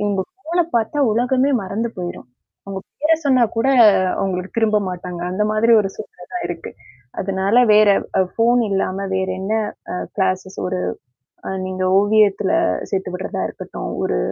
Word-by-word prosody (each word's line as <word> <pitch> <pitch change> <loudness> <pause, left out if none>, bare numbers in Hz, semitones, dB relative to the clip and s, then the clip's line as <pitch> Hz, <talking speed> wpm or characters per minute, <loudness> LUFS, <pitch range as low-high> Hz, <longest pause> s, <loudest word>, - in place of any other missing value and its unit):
இவங்க 205 -2 0
ஃபோன 350 -2 -1
பாத்தா 230 +6 -1
உலகமே 255 +4 +2
மறந்து 215 +5 -2
போயிரும். 175 -8 -6 0.4
அவங்க 195 -1 -6 0.2
பேர 310 +2 +4
சொன்னா 260 -3 +4
கூட 230 - +1 0.5
அவங்களுக்கு 185 0 -3
திரும்ப 215 -2 +3
மாட்டாங்க, 180 -1 -6
அந்த 210 +3 0
மாரி 215 +2 +3
ஒரு 195 - -2
சூழ்நிலை 180 - -10
தான் 360 - -3
இருக்கு. 170 -1 -6 0.5
அதனால 195 +3 0 0.2
வேற 210 0 +6 0.3
அ - - +5
ஃபோன் 240 +1 +3
இல்லாம 195 0 -1
வேற 190 0 0
என்ன 195 +3 -3 0.4
அ - - -3 0.2
கிளாஸஸ் 190 -1 -1
ஒரு 90 - -2 0.7
அ - - -3 0.2
நீங்க 185 0 -3
ஓவியத்துல 205 -1 +3 0.4
சேர்த்து 190 -1 -2
விடுறதா 185 - -4
இருக்கட்டும். - - -7
ஒரு - - 0
195 Hz, 150 wpm, -20 LUFS, 185-230 Hz, 0.7 s, வேற